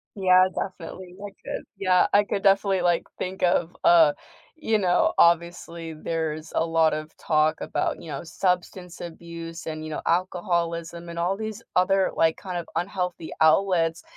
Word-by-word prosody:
Yeah, 185 -1 +5
definitely, 185 0 -6
I 205 - -5 0.2
could. - - -4
Yeah, 185 -2 +3
I 205 +1 +6
could 200 -1 -3
definitely, 195 -1 +3
like, 175 -1 +2 0.2
think 185 0 -4
of, 175 -1 +1
uh, 160 -4 +6 0.4
you 225 -8 0
know, 180 -3 +2
obviously 170 -1 +1
there's 155 0 -4
a 165 - +2
lot 165 -1 +2
of 155 +1 -6
talk 155 0 +1
about, - - -2
you 165 - -10
know, 140 +3 -5
substance 180 +1 -2
abuse, 170 0 -8
and, 155 0 -5
you 155 - -6
know, - - -4
alcoholism, 170 -1 -1
and 170 0 -6
all 185 +3 0
these 220 0 -5
other, 190 +1 +3
like, 160 0 +2
kind 185 -3 -5
of 170 - -5
unhealthy 180 -2 -3
outlets. 165 0 +3
175 Hz, 160 wpm, -25 LUFS, 165-185 Hz, 0.4 s, I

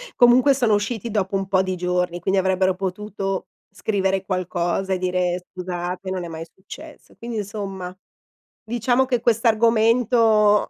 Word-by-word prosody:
comunque 250 +3 +6
sono 240 -5 +2
usciti 220 +2 -1
dopo 195 -2 -1
un 195 -1 -1
po' 190 -1 +3
di 185 -1 -2
giorni, 180 0 -1
quindi 190 +3 +1
avrebbero 190 0 +2
potuto 195 0 -4 0.3
scrivere 195 -2 -1
qualcosa 185 0 -1
e - - 0
dire: 180 -1 -1
"Scusate, 180 0 -5
non 185 -2 -3
è - - -6
mai 165 0 -7
successo". 295 +11 -13
Quindi 235 -1 -6
insomma, 195 -3 -5 0.7
diciamo 240 +3 +1
che 245 -3 0
quest'argomento 225 -1 +3
195 Hz, 140 wpm, -22 LUFS, 185-225 Hz, 0.7 s, comunque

